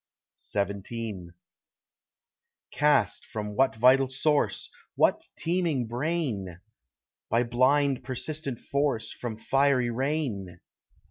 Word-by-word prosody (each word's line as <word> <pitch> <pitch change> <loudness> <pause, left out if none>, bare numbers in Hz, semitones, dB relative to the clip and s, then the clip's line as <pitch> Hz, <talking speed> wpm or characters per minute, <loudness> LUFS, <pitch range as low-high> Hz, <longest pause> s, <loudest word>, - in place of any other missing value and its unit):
XVII 100 -1 -3 1.4
Cast 145 -9 +2
from 105 -1 -5
what 135 0 +3
vital 130 +3 +5
source—what 145 +3 0
teeming 165 -7 0
brain? 120 - -2 0.7
By 115 +2 +3
blind 130 +3 +2
persistent 135 +1 -4
force—from 125 -5 -2
fiery 135 0 +2
rain? 120 - -2
125 Hz, 75 wpm, -27 LUFS, 110-145 Hz, 1.4 s, vital